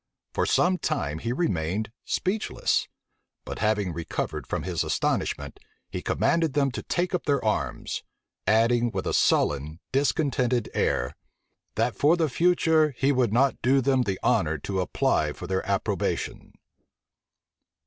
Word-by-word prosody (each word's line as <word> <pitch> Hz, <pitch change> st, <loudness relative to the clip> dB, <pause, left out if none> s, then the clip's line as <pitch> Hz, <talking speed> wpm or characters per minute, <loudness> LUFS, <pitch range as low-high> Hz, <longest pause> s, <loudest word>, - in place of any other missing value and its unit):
For -, -, 0 dB
some 180 Hz, +1 st, +3 dB
time 75 Hz, 0 st, -2 dB
he 115 Hz, -, -3 dB
remained 105 Hz, -, -1 dB
speechless; 205 Hz, +4 st, 0 dB, 0.6 s
but -, -, -6 dB
having 105 Hz, -4 st, +1 dB
recovered 80 Hz, -1 st, -4 dB
from -, -, -2 dB
his 90 Hz, -2 st, -1 dB
astonishment, -, -, -1 dB, 0.3 s
he -, -, -4 dB
commanded 165 Hz, -4 st, +1 dB
them 140 Hz, -2 st, +2 dB
to -, -, -5 dB
take 180 Hz, +1 st, -1 dB
up 180 Hz, -, -1 dB
their 140 Hz, -5 st, +1 dB
arms; 105 Hz, -, -1 dB, 0.5 s
adding 115 Hz, +2 st, +3 dB
with -, -, -4 dB
a -, -, -1 dB
sullen, 75 Hz, +3 st, +2 dB
discontented 130 Hz, -3 st, +1 dB
air, 60 Hz, -, 0 dB, 0.6 s
"That 115 Hz, +2 st, 0 dB
for 155 Hz, +4 st, +4 dB
the 160 Hz, -3 st, +1 dB
future, 160 Hz, -2 st, +3 dB
he 135 Hz, +1 st, +3 dB
would 125 Hz, -5 st, +2 dB
not 130 Hz, +4 st, +2 dB
do 135 Hz, +3 st, +4 dB
them 130 Hz, 0 st, +2 dB
the 100 Hz, -6 st, -2 dB
honor 75 Hz, 0 st, +2 dB
to 95 Hz, +5 st, -2 dB
apply 75 Hz, -3 st, +1 dB
for 90 Hz, -, -8 dB
their 95 Hz, +1 st, -1 dB
approbation." -, -, -2 dB
120 Hz, 140 wpm, -26 LUFS, 95-145 Hz, 0.6 s, for